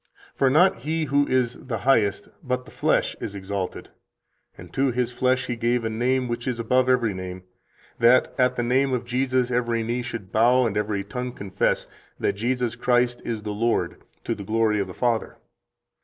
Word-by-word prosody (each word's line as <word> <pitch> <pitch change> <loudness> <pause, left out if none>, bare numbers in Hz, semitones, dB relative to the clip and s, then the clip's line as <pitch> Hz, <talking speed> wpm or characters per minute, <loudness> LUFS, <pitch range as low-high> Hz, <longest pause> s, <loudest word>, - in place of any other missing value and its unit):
For 135 - +2
not 175 +8 +4
He 155 +7 -2
who 145 0 +2
is 125 -2 +1
the 125 -3 -5
Highest, 105 -5 +2
but 125 0 -2
the - - -14
flesh, - - +1
is 100 - -5
exalted; 95 -1 -4 0.7
and - - -12
to 135 +1 +2
his 125 0 -1
flesh 130 +1 +1
He 120 - -3
gave 120 0 0
a 110 - -1
name 125 +3 0
which 120 +1 -4
is 125 -2 -2
above 125 +3 +2
every 120 -5 +2
name, 95 0 -7 0.6
that 120 +2 +5
at 125 0 +3
the 120 - -1
name 130 +2 +2
of 125 -1 -1
Jesus 125 0 0
every 120 -2 0
knee 120 +2 -1
should 115 -5 -6
bow, 120 +3 +4
and 110 -3 -1
every 105 -1 -1
tongue 125 +4 -5
confess 100 -3 -1 0.3
that - - +1
Jesus 120 +2 -1
Christ 120 0 +1
is 110 -3 -4
the 105 -1 -3
Lord, 115 +3 -1 0.2
to - - -1
the 100 - -7
glory 110 +1 +1
of 100 - -1
the 90 - -9
Father. 120 -2 -1
120 Hz, 190 wpm, -24 LUFS, 110-125 Hz, 0.7 s, that